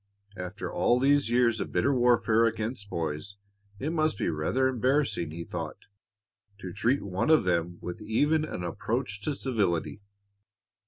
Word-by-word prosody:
After 90 +2 -6
all 120 - +3
these 140 -1 +3
years 120 -2 +3
of - - -4
bitter 140 - +2
warfare 120 -2 +4
against 110 -1 -3
boys 80 +3 -4 0.4
it 140 +9 -2
must 155 -8 +1
be - - 0
rather 80 +13 +1
embarrassing, 130 - +1
he 85 +2 -6
thought, - - -5 0.8
to 95 -3 -7
treat 120 +7 +1
one 95 +6 -1
of 160 -1 +6
them 85 -1 0
with 90 +5 -6
even 145 +9 +2
an 120 -12 -5
approach 105 +4 -3
to 145 +6 -2
civility. 105 -9 -1
110 Hz, 150 wpm, -28 LUFS, 90-130 Hz, 0.8 s, of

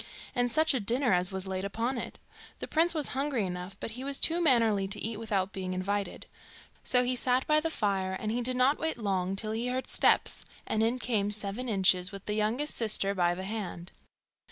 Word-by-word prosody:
And 245 0 +1
such 315 +3 +4
a 260 - +1
dinner 240 +2 +1
as 180 +2 +1
was 190 0 -2
laid 190 0 -3
upon 230 +5 -2
it! - - -7 0.4
The - - -6
prince 335 +2 +2
was 300 -4 +1
hungry 270 -5 -1
enough, 180 +2 -6
but - - -5
he 250 +4 -7
was 280 0 -2
too 335 +2 +3
mannerly 225 - +3
to 200 +2 -3
eat 225 -1 -3
without 200 -4 -1
being 185 -1 -4
invited. 200 +2 -2 0.6
So 250 -1 +3
he 250 +1 +1
sat 250 +1 +1
by 305 0 +4
the 325 +1 -1
fire, 195 -8 -1
and 215 - -2
he 240 +2 -1
did 255 +1 -1
not 265 +4 +3
wait 320 -3 -1
long 195 -4 -1
till 215 +2 -3
he 230 +3 -2
heard 255 +1 -3
steps, - - +3 0.2
and 220 - 0
in 230 +3 +2
came 220 -5 0
Seven 210 +4 -3
Inches 185 -3 +3
with 195 -1 -9
the 210 - -2
youngest 220 +8 0
sister 210 -3 +1
by 175 -2 +1
the 185 - -6
hand. 190 -4 -5
220 Hz, 215 wpm, -29 LUFS, 195-250 Hz, 0.6 s, such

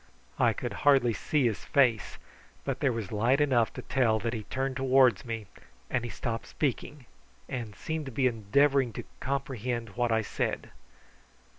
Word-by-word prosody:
I - - +4
could - - -4
hardly 135 -5 +5
see 145 +4 0
his 110 -4 -1
face, 125 -7 +2 0.5
but - - -2
there 140 -3 +2
was 115 -5 -4
light 115 +6 +2
enough 130 -6 +3
to - - -7
tell 120 -5 +2
that 115 0 -2
he 110 -3 -5
turned 135 0 -2
towards 130 -1 +4
me, 115 -2 -4 0.5
and 125 - 0
he 120 - -4
stopped 115 -2 -4
speaking, 145 -1 -3 0.4
and 115 -5 -5
seemed 160 -2 -4
to - - -5
be 130 +2 0
endeavouring 130 +3 +2
to - - -6 0.2
comprehend 125 -4 -3
what 120 +3 -1
I 110 0 +2
said. - - -3
125 Hz, 165 wpm, -29 LUFS, 115-135 Hz, 0.5 s, hardly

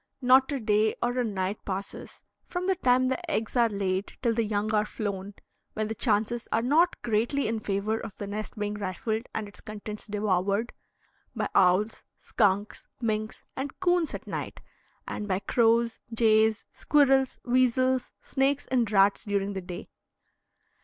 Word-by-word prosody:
Not 260 +2 +5
a 280 - -1
day 215 -1 +2
or 245 +1 0
a - - +2
night 200 -2 -2
passes, 195 0 -6 0.2
from 355 0 -3
the 380 - +3
time 255 -6 +3
the 340 +6 -3
eggs 225 -7 -2
are 235 -2 +4
laid 195 -1 -2
till 235 -2 +3
the 230 0 +1
young 210 0 -1
are 210 -1 +3
flown, 200 -2 -5 0.4
when 215 0 -2
the - - -1
chances 225 +1 0
are 230 - +1
not 310 +8 +3
greatly 235 +4 +1
in 225 0 -1
favor 210 +2 -1
of 220 -4 -8
the 205 - -5
nest 210 +2 -5
being 210 0 -2
rifled 210 +3 -3
and 215 - -2
its 205 - -14
contents 210 0 -7
devoured, 205 +1 0 0.6
by - - -1
owls, 190 +4 +3
skunks, 205 -1 0
minks, 215 -2 -2
and 270 +1 -5
coons 355 -3 +1
at - - -8
night, - - -5 0.5
and 210 - -4
by 185 -2 +1
crows, 230 +3 +2
jays, 220 -1 +3
squirrels, 270 -3 +3
weasels, 255 +1 +2
snakes, 275 +1 0
and 240 -5 +2
rats 195 0 +4
during 200 -1 -1
the 190 - -4
day. 180 -1 -8
220 Hz, 160 wpm, -27 LUFS, 205-250 Hz, 0.6 s, Not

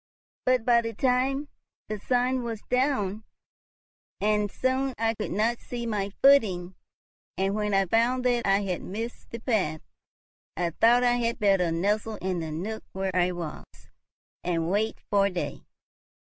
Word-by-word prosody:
But 255 -3 +3
by 235 -1 +5
that 230 -2 -5
time 265 +3 +1 0.4
the 215 0 -4
sun 250 +3 +1
was 230 -3 -5
down, 250 -6 +1 1.0
and 210 0 +1
soon 260 +3 -1
I 225 +1 +1
could - - -4
not 225 +4 0
see 240 -1 -6
my 205 -3 -1
footing; 195 -10 +4 0.6
and, 195 +1 +1
when 210 -1 0
I 195 0 +3
found 235 +6 +2
that 240 -3 +2
I 195 +1 +4
had 185 -3 -2
missed 225 +5 -6
the 230 - -6
path, 200 - 0 0.8
I 175 -1 0
thought 235 +8 +4
I 245 0 +3
had 235 -1 0
best 195 -5 +3
nestle 210 +5 0
in 185 -3 -2
the 160 -1 -4
nook 195 +8 -4
where 190 -1 -2
I 180 0 +3
was, 170 -4 -6 0.8
and 165 -1 0
wait 215 +3 0
for 200 -1 +4
day. 180 -2 -5
215 Hz, 155 wpm, -27 LUFS, 190-240 Hz, 1.0 s, by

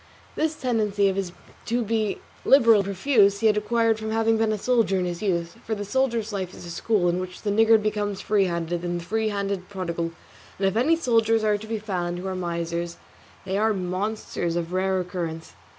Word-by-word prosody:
This 315 0 0
tendency 210 -6 +1
of 190 - -2
his 195 -3 -2 0.4
to 240 +1 +1
be 220 -1 0 0.3
liberal 230 -5 +6
and 200 - +1
profuse 200 0 +3
he - - 0
had 215 -1 +5
acquired 225 +1 +1
from 220 0 -4
having 225 0 +2
been 220 0 +1
a 215 - 0
soldier 230 -3 +2
in 180 - 0
his 175 -1 -4
youth, 170 -4 -1
for 220 - -2
the 205 0 -5
soldier's 230 -1 0
life 190 -2 -4
is - - -10
a 170 - -7
school 190 +1 +1
in 175 +1 +1
which 180 0 -7
the 205 - 0
niggard 220 +1 +5
becomes 205 -2 -1
free 205 -2 +2
handed 170 -1 -2
and 175 0 -2
the 170 - -9
free 220 +3 0
handed 200 -2 -3
prodigal; 170 -4 -3 0.5
and 195 - +1
if 195 - -1
any 270 +9 +4
soldiers 225 -7 +2
are 210 -1 +3
to 220 - -9
be 225 0 -2
found 180 -5 -3
who 180 - -6
are 190 - -2
misers, 170 -1 -3 0.5
they 190 +1 -1
are 220 0 +2
monsters 185 -2 -2
of 175 0 -3
rare 190 0 +1
occurrence. 170 -3 -5
200 Hz, 215 wpm, -25 LUFS, 180-220 Hz, 0.5 s, liberal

